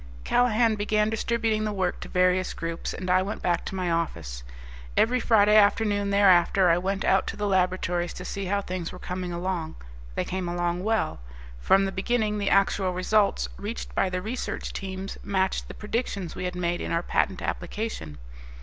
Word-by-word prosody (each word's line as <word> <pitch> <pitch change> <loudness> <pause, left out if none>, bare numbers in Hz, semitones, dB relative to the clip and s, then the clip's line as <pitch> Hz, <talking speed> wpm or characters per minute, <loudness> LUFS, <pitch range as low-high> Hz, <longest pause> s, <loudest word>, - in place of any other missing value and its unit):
Callahan 240 -2 +3
began 210 +1 +1
distributing 225 -1 0
the 215 - -1
work 190 -3 -1
to - - -8
various 180 0 +2
groups, 165 0 -4
and 185 - -6
I 185 +1 +4
went 200 +3 -4
back 175 -1 +1
to - - -5
my 180 -2 -1
office. 85 - -2 0.6
Every 250 +2 +3
Friday 210 -3 +4
afternoon 205 -1 +3
thereafter 190 -2 +5
I 170 - +3
went 195 +2 -2
out 190 0 +3
to - - -4
the 210 - -2
laboratories 180 -2 +1
to 180 - -8
see 200 +1 -4
how 200 +2 0
things 180 -3 -4
were - - -9
coming 180 0 -4
along. 170 -2 -3 0.4
They - - -1
came 185 -1 -3
along 175 +1 -1
well. 220 - 0 0.4
From 195 - +4
the 195 - -2
beginning 210 +2 0
the 200 - 0
actual 195 -1 +2
results 185 - +1
reached - - -6
by 185 - +1
the 180 0 -3
research 240 +5 -4
teams 190 0 -6
matched 190 -1 0
the - - -9
predictions 210 -5 -3
we 180 - -5
had 180 0 -3
made 175 -1 -1
in - - -4
our 170 +1 0
patent 190 +1 0
application. 175 - -4
190 Hz, 185 wpm, -26 LUFS, 175-210 Hz, 0.6 s, thereafter